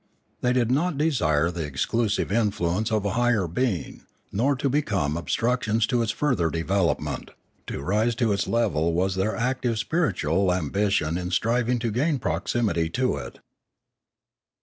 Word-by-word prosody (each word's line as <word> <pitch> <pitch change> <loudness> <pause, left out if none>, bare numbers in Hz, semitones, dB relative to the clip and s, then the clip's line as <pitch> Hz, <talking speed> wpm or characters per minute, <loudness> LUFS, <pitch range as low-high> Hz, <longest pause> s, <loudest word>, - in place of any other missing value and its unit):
They 125 - +2
did 125 -2 +1
not 155 +3 +1
desire 85 - +2
the 85 -2 -4
exclusive 100 - -1
influence 105 -1 0
of 105 -2 0
a 100 - 0
higher 120 -4 +2
being, 95 +2 -2 0.3
nor 125 +8 +1
to 135 - -1
become 100 - 0
obstructions 115 +4 0
to 120 +1 +1
its 110 -2 0
further 125 - +1
development; 85 -1 -1 0.4
to 70 - -5
rise 110 +7 +1
to 115 -2 +1
its 100 - -1
level 85 -9 +1
was 95 +3 +1
their 95 +3 -1
active 125 0 -1
spiritual 100 - +1
ambition 90 -1 0
in 90 0 -4
striv 115 +5 +1
ing 125 - +2
to 115 -1 -2
gain 140 +7 +1
proximity 90 -3 0
to 125 +7 0
it. - - -8
105 Hz, 150 wpm, -25 LUFS, 90-120 Hz, 0.4 s, They